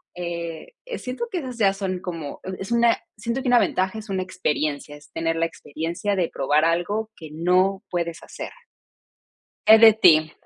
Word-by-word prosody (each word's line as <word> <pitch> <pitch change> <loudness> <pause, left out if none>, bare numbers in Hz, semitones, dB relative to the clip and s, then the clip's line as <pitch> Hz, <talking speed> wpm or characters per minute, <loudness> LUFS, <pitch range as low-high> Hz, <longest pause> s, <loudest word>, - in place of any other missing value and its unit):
eh, 170 - -5
eh, - - -5
siento 255 - -4
que 365 - -1
esas 255 -5 -7
ya 200 -4 +3
son 190 -2 -3
como, 165 -5 -6
e 190 - -5
es 195 +3 -6
una, 235 0 +4 0.2
siento 235 +5 -2
que 260 - -4
una 245 0 +5
ventaja, 190 -1 0
es 220 0 -9
una 190 -1 0
experiencia, 150 -5 -2
es 145 0 -17
tener 165 0 -1
la 165 0 +1
experiencia 165 +6 -4
de 180 -3 0
probar 145 +3 +1
algo 190 +7 0
que 160 -2 -10
no 185 +4 +2
puedes 170 -1 -3
hacer. - - -8 1.2
Eh, 220 0 +9
de 225 -1 +9
ti. 160 -7 +5
185 Hz, 185 wpm, -23 LUFS, 165-220 Hz, 1.2 s, Eh